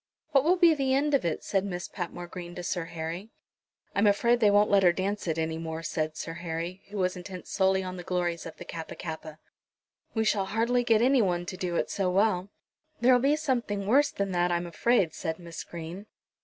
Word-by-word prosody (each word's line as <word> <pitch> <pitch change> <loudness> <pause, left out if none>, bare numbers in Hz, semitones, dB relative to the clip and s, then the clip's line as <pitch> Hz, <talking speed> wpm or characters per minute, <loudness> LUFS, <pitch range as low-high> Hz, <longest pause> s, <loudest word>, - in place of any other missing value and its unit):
"What 275 -3 +4
will 345 +4 +4
be 345 -3 +6
the 270 -3 +1
end 290 +2 +1
of 275 - +3
it?" 165 - -1
said 195 -2 0
Miss 180 -3 -4
Patmore 175 -1 -5
Green 175 0 -8
to 180 - -6
Sir 175 -1 -2
Harry. 170 +4 -5 0.6
"I - - 0
am 210 - +5
afraid 235 +4 +3
they 215 -3 +5
won't 205 +1 +4
let 200 -1 +6
her 180 -2 +6
dance 195 +2 -2
it 160 -1 0
any 160 0 -1
more," 165 0 -5
said 155 -1 -2
Sir 165 - -5
Harry, 170 +2 -5
who 205 - -6
was 185 -1 +1
intent 180 0 -8
solely 190 -1 +2
on 185 0 -5
the 180 - -7
glories 175 -2 -1
of 165 - -10
the - - -9
Kappa 165 -1 -7
kappa. 160 -2 -7 0.8
"We 220 - +2
shall 200 -3 +2
hardly 230 +5 +1
get 225 -1 +4
any 260 0 +5
one 175 -3 0
to 185 - -5
do 180 -2 -3
it - - 0
so 195 -2 0
well." 195 0 +2 0.5
"There'll 250 +1 +5
be 275 +4 +3
something 240 -10 -1
worse 280 +7 +4
than 200 -1 -2
that, 175 0 +1
I'm 175 0 0
afraid," 175 0 +2
said 160 0 -3
Miss 170 -2 -8
Green. 170 +5 -8
185 Hz, 225 wpm, -28 LUFS, 170-220 Hz, 0.8 s, be